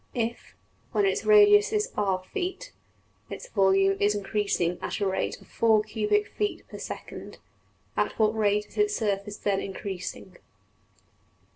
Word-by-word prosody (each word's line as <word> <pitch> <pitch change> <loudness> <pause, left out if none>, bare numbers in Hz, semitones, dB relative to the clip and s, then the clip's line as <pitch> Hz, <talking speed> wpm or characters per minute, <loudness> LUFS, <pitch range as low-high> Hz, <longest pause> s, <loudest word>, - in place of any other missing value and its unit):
If, 235 -1 -3 0.4
when 410 - +3
its 390 - 0
radius 415 0 +6
is 430 +3 0
$r$~feet, 355 - -2 0.6
its - - -7
volume 195 0 +3
is 205 +1 +2
increasing 200 -4 -1
at - - -4
the 205 - -1
rate 190 0 -1
of - - -18
$4$~cubic 210 -2 +2
feet 415 -1 -3
per~second, - - -8 0.6
at - - -1
what 215 0 +2
rate 210 -1 +1
is - - -19
its 420 0 +2
surface 205 -1 -2
then 200 -1 0
increasing? 190 -1 -6
210 Hz, 130 wpm, -27 LUFS, -, 0.6 s, radius